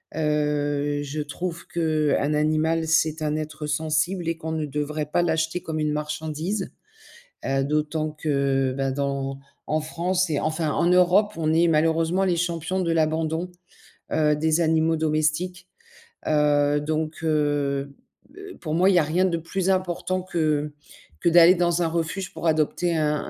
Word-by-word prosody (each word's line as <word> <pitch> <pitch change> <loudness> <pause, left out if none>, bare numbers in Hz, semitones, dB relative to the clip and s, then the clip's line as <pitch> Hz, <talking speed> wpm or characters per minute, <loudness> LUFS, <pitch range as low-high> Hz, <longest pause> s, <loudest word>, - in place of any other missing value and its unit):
Heu, 145 -1 0
je 145 +1 -4
trouve 170 +4 -5
qu'un 155 -3 0
animal, 155 +2 +1
c'est 160 0 +1
un 150 0 0
être 155 0 -5
sensible 160 +4 -1
et 165 - -2
qu'on 160 -1 -5
ne 160 -1 -2
devrait 150 +1 -3
pas 175 +3 +1
l'acheter 160 +1 0
comme 160 -1 -3
une 150 -1 0
marchandise, 155 +6 -3 0.7
heu, 135 0 0
d'autant 150 +1 -1
que 140 -3 0
ben, 135 -1 -1
dans 140 -1 -2 0.3
en 155 +1 0
France 175 +4 -1
et 150 -2 0
enfin 155 0 -1
en 165 - +1
Europe, 180 +4 +4
on 160 -1 +1
est 170 +1 +4
malheureusement 165 +3 +2
les 180 -3 +1
champions 170 +1 -2
de 170 -2 0
l'abandon, 160 +2 0 0.6
heu, 150 -1 +2
des 160 +2 +1
animaux 160 0 +2
domestiques, 155 +3 -1 0.6
heu 145 -1 +3
donc 155 +1 -3
heu, 145 -3 0 0.4
b - - -22
heu, 390 -1 -10
pour 155 -2 -4
moi, 185 +3 +4
il 195 - +3
y - - +6
a - - +3
rien 160 +5 +1
de 175 -3 0
plus 185 +3 -2
important 185 0 0
que 155 -5 -1 0.5
que - - 0
d'aller 170 +2 +7
dans 175 -1 +1
un 170 - +2
refuge 170 +3 -3
pour - - -7
adopter 160 +2 +1
un 150 -1 +1
155 Hz, 160 wpm, -24 LUFS, 150-170 Hz, 0.7 s, d'aller